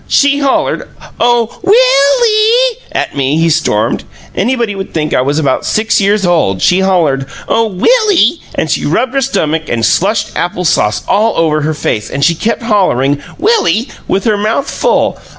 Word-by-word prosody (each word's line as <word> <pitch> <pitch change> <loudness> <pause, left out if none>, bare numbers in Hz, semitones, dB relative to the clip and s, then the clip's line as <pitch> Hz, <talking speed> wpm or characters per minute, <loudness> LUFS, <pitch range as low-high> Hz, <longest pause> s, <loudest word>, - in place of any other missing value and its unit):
"She 280 0 +2
hollered, 275 -2 -1 0.3
'Oh, 235 -1 +1
WILL 430 - +3
EE' 460 +3 +1
at - - -3
me!" 140 +2 0
he 165 0 +2
stormed. 145 -10 0 0.3
"Anybody 235 +1 -1
would 195 -2 -7
think 155 -1 -1
I - - +2
was 140 +3 -1
about 140 -4 0
six 215 0 0
years 200 0 +1
old! 160 - +1
She 180 - +2
hollered, 165 -8 +1 0.2
'Oh, 230 0 +1
Will 430 - +2
ee,' 335 - +2
and - - -2
she - - -1
rubbed 255 0 -1
her 275 - 0
stomach 160 - -1
and 115 -1 0
slushed 205 - 0
apple 180 +1 -2
sauce 105 -9 +1
all 215 +2 +1
over 155 -2 +1
her 155 +1 -2
face, 110 -7 -3
and 140 +1 -1
she 170 - +3
kept 225 +8 -3
hollering, 145 - +1 0.2
'Will 435 +8 +1
ee!' 215 - 0 0.2
with 195 - -1
her 215 -2 +1
mouth 220 +7 -1
full. - - 0
200 Hz, 180 wpm, -12 LUFS, -, 0.3 s, WILL